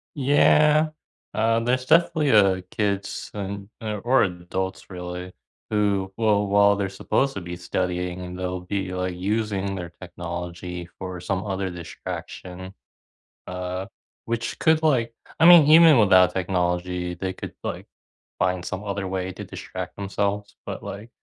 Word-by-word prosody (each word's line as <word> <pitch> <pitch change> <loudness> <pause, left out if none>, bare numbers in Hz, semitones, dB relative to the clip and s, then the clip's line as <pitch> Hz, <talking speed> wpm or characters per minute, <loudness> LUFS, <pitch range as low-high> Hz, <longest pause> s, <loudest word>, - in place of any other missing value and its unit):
Yeah. 150 +2 +4 0.4
Uh, 115 +1 +2
there's 125 +2 0
definitely, 160 -1 +3
uh, 95 -3 +5
kids 100 -2 -2
and, 100 0 -5
uh, 105 -1 -3
or 130 +3 +4
adults, 95 +1 -4
really, 90 0 -6 0.4
who 100 -3 +1
will, 105 -2 +2
while 100 0 +5
they're 100 -1 -2
supposed 135 +7 0
to 95 - -4
be 90 0 -6
studying 90 +1 -2
and 90 0 -7
they'll 90 0 -3
be, 95 0 -3
like, 90 0 -2
using 100 0 -1
their 90 -2 -6
technology 90 0 -6
for 90 -1 -6
some 95 +1 -2
other 95 -1 -2
distraction. 90 +1 -7 0.7
Uh, 90 +1 -4 0.4
which 115 0 -3
could, 160 -1 +4
like 125 -7 +2 0.3
I - - +6
mean, 170 -4 +9
even 160 -2 +8
without 95 -4 +6
technology, 90 -1 -1
they 95 +1 -3
could, - - -8
like, - - -4 0.5
find 90 -1 0
some 95 +2 -4
other 100 -1 -3
way 95 0 -3
to - - -8
distract - - -7
themselves, 100 +1 -2
but, - - -5
like, 105 +4 -7
95 Hz, 145 wpm, -24 LUFS, 90-110 Hz, 0.7 s, mean